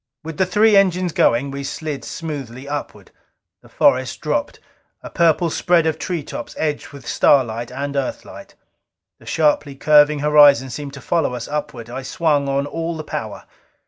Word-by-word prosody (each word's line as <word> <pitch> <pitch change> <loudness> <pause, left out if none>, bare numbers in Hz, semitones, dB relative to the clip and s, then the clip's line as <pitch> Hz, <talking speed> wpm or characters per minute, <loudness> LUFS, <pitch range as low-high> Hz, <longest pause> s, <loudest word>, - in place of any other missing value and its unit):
With 160 -1 -7
the 190 - +1
three 210 +3 +4
engines 185 -2 +3
going, 130 +4 +2
we 140 0 -5
slid 145 -1 -5
smoothly 140 -5 -7
upward. 145 0 -6 0.5
The - - -19
forest - - +1
dropped, - - -2 0.4
a - - -9
purple 170 0 +2
spread 175 -1 +2
of 160 -1 -1
treetops 160 -9 -5
edged 150 -2 -2
with 140 -3 -13
starlight 120 -4 +2
and 140 +1 -4
Earthlight. 135 -2 -5 0.6
The - - -18
sharply 150 -2 +1
curving 150 +1 +4
horizon 145 -3 +5
seemed 140 +2 -7
to 140 - -10
follow 160 -4 0
us 120 -1 -6
upward. 140 -6 -5
I 125 +3 -6
swung 145 +1 0
on 140 +1 0
all 165 +2 -4
the 155 - -6
power. - - -6
145 Hz, 160 wpm, -20 LUFS, 135-160 Hz, 0.6 s, horizon